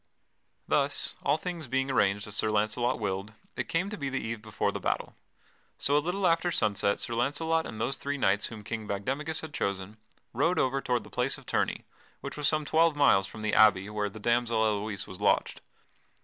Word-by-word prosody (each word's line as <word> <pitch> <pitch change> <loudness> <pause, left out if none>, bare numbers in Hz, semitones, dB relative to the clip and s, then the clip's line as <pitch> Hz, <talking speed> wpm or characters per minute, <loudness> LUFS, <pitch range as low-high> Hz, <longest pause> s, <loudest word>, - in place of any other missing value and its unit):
Thus, - - +3
all - - +2
things 170 -4 -5
being 135 +2 0
arranged 100 -5 +2
as 105 - -7
Sir 110 - +1
Launcelot 110 +4 +1
willed, 95 +2 -3 0.2
it - - -3
came 185 +5 0
to 210 - -5
be 140 -1 -2
the 135 - -2
eve 115 0 -4
before 110 -1 -1
the - - -4
battle. - - -2 0.6
So 140 - +1
a 150 - +4
little 180 +5 -1
after 170 +1 +3
sunset 105 - +1
Sir 115 - -4
Launcelot 155 +7 0
and 110 - -8
those 130 +4 -1
three 145 0 -3
knights 100 -5 +2
whom 110 -2 -9
King 110 0 -5
Bagdemagus 140 +11 -2
had 160 -2 -8
chosen 100 -2 -3 0.4
rode 165 +9 +2
over 135 +1 +1
toward 125 -4 0
the 105 - -14
place 125 +2 0
of - - -15
tourney - - -1 0.4
(which - - -6
was 150 -1 0
some 155 -1 +1
twelve 160 +1 +3
miles 95 -10 +4
from 110 +2 -9
the 110 - 0
abbey 105 -2 +5
where 105 -1 -1
the 105 - -11
damsel 120 0 +2
Elouise 105 -1 -1
was 95 - -10
lodged). - - +1
120 Hz, 205 wpm, -29 LUFS, 105-145 Hz, 0.6 s, abbey